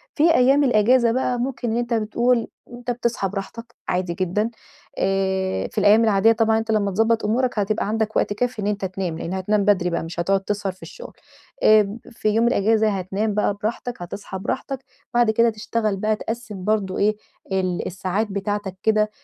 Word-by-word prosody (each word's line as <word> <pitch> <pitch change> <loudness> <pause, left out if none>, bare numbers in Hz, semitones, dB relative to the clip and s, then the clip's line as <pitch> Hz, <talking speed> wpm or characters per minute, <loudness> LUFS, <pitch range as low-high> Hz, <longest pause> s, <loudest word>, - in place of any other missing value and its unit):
في 325 +2 +4
أيّام 270 +3 +4
الأجازة 235 0 +4
بقى 250 0 0
ممكن 245 -2 -2
إن 230 - 0
أنت 240 0 -1
بتقول، 235 +2 +1 0.3
أنت 245 0 -4
بتصحى 235 -5 -1
براحتك 230 +5 -7
عادي 180 -1 -1
جدًا 185 +5 -1 0.5
آآ 190 -1 0
في - - -18
الأيّام 210 +2 +5
العاديّة 215 0 +4
طبعًا 225 -1 +2
أنت 220 0 -3
لمّا 205 -2 +1
تضبط 225 +3 +1
أمورك، 240 +1 0
هتبقى 205 0 0
عندك 220 0 -1
وقت 205 - +1
كافي 245 0 -2
إن - - -1
أنت 205 -2 -1
تنام، 185 -3 -3
لأن 175 - -4
هتنام 200 +2 0
بدري 190 -4 +3
بقى، 170 - -2
مش 165 +1 -7
هتقعد 195 +3 +1
تسهر 195 -1 -3
في 185 - -17
الشغل. - - -10 0.5
آآ 215 0 +5
في 220 -1 -1
يوم 225 +3 +3
الأجازة 220 0 +3
هتنام 200 +2 -2
بقى 210 0 +1
براحتك، 235 0 -3
هتصحى 190 +1 -7
براحتك، 265 +5 -4 0.3
بعد 240 -2 +4
كده 230 +1 +3
تشتغل 215 -1 -2
بقى 215 +2 +1
تقسم 215 -3 -6
برضو 205 -2 0
إيه، 210 +1 +2 0.4
ال 185 -2 -1
الساعات 190 +4 -2
بتاعتك 200 -1 -3
كده، 215 -1 +3
215 Hz, 180 wpm, -22 LUFS, 195-230 Hz, 0.5 s, الأيّام